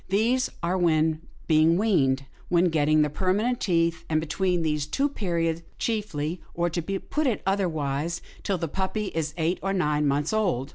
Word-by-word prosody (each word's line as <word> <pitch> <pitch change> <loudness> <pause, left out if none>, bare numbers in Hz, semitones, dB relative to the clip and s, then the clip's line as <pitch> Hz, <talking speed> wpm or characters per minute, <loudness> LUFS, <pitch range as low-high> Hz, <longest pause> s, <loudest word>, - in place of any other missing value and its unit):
These 235 +6 +2
are 180 +2 +1
when 160 -2 +2 0.2
being 160 +1 +4
weaned, 140 -11 +2 0.2
when 175 0 +4
getting 155 -1 +3
the 150 - 0
permanent 205 +9 0
teeth, 165 -3 +1
and 155 -1 +2
between 175 +2 0
these 150 -2 0
two 275 - +1
periods 170 - -1 0.2
chiefly, 175 -7 -2
or 175 0 0
to 170 - -1
put 195 - -2
it 230 -6 -1
otherwise, 170 -4 -1 0.2
till 195 - -1
the 165 -1 -2
puppy 195 +5 -2
is 155 -2 -3
eight 170 +2 0
or 195 0 -1
nine 150 -5 +1
months 145 +6 0
old.' 180 - 0
170 Hz, 170 wpm, -26 LUFS, 155-195 Hz, 0.2 s, being